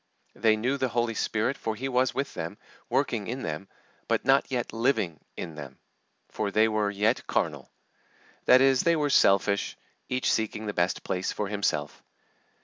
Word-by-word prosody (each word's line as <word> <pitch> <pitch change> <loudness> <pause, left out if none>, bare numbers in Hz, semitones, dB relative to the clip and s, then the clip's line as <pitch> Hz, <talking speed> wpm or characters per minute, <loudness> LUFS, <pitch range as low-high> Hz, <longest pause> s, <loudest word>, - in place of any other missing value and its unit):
They 110 -1 +3
knew 125 +6 0
the 130 -1 0
Holy 120 -1 0
Spirit, 110 +4 -1
for 110 - -2
He 130 +5 -3
was 130 -1 +2
with 140 +1 -3
them, 80 0 -5 0.3
working 105 -4 0
in 130 +3 -4
them, 80 +5 -4 0.4
but - - 0
not 135 +1 +4
yet 125 -2 -2
living 115 - 0 0.2
in 85 - -5
them, 70 -3 -9 0.5
for - - -2
they 110 +2 +4
were 110 -2 0
yet 105 +4 0
carnal; - - -1 0.8
that 130 - +7
is, 135 -1 +4
they 170 0 +3
were 150 -2 0
selfish, 100 -3 +3 0.3
each 125 0 +1
seeking 110 -1 -2
the 105 - -3
best 90 0 0
place 90 0 -2
for 105 -2 -3
himself. 75 -8 -2
110 Hz, 170 wpm, -27 LUFS, 100-130 Hz, 0.8 s, that